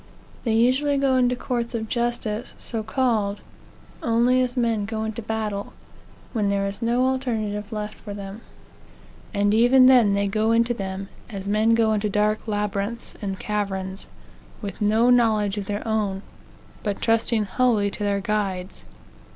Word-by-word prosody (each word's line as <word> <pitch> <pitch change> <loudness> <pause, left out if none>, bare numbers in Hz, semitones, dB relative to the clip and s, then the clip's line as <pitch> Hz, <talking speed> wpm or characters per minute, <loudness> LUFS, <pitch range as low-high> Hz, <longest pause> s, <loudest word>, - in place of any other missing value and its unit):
They 225 - +1
usually 260 +5 +3
go 275 -1 +2
into 250 -1 +3
courts 240 -1 -3
of 220 -1 -3
justice, 235 -1 -2
so 225 -2 -3
called, 220 -3 0 0.6
only 240 +2 +3
as 250 0 -2
men 230 -4 +1
go 220 +1 -3
into 220 +1 -4
battle 215 -2 -3 0.6
when 210 -4 +1
there 200 0 +1
is 200 +3 -4
no 240 +2 +2
alternative 220 -5 -2
left 210 -1 -5
for 205 -2 -7
them. 200 +2 -8 0.9
And 205 +1 +2
even 245 +4 +6
then 240 -6 +6
they 200 0 +1
go 215 +3 +1
into 235 +1 +3
them 195 -2 -5 0.2
as 195 -3 -6
men 215 +3 +3
go 225 -1 +3
into 210 0 0
dark 210 +2 0
labyrinths 210 +2 -2
and 195 -2 -3
caverns 195 -2 -3 0.5
with 205 -1 -7
no 220 +4 +4
knowledge 215 -4 +3
of 195 - -6
their 205 +2 -3
own, 205 -3 -1 0.6
but 205 -2 -2
trusting 225 -1 +2
wholly 210 0 +1
to 205 - -5
their 200 -1 0
guides. 195 -3 -2
215 Hz, 155 wpm, -24 LUFS, 205-235 Hz, 0.9 s, even